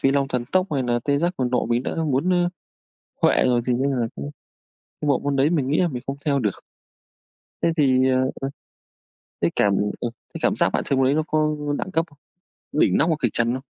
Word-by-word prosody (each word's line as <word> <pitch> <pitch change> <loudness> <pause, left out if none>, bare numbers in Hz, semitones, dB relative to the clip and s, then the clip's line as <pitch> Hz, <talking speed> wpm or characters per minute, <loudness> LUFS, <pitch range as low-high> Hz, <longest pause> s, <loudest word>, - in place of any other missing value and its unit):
Phi 135 - +3
Long 140 -1 +1
Thần 125 -2 -2
Tốc 185 0 +3
hay 135 -3 +1
nà 120 -1 +1
Tê 140 -1 +2
Giác 175 +3 0
Cuồng 125 -2 -1
Nộ 125 -2 +1
mình 120 +1 +1
đã - - -3
muốn, 145 +4 +1
ơ, 175 -1 +2 0.7
huệ - - +4
rồi, 125 -1 +3
thì 125 - +2
nên 130 +3 +1
là 125 -4 0
cũng 70 +1 -6 0.7
cái 150 - -2
bộ 140 - +3
môn 140 -1 -1
đấy 140 +3 +3
mình 145 -6 0
nghĩ 150 - +1
là 180 - +3
mình 125 -4 -5
không 135 +1 -3
theo 140 -2 +2
được. 105 -6 0 1.1
Thế - - +3
thì, 130 -3 +3
ờ, 130 - +2
ờ, 130 - +1 1.1
cái - - +2
cảm 100 -1 +3 0.3
ờ, 120 - -1 0.2
cái - - -6
cảm - - +2
giác - - +2
bạn - - 0
chơi 135 - 0
môn 135 - +3
đấy 135 - +3
nó 155 +1 +1
có 155 0 +1 0.2
đẳng 190 - -4
cấp 165 -2 +1
không? 145 - -22 0.6
Đỉnh 150 - +3
nóc - - +3
hoặc 160 - +2
kịch 120 -4 +1
trần 115 +1 +2
không? 130 - -4
135 Hz, 245 wpm, -23 LUFS, 125-150 Hz, 1.1 s, huệ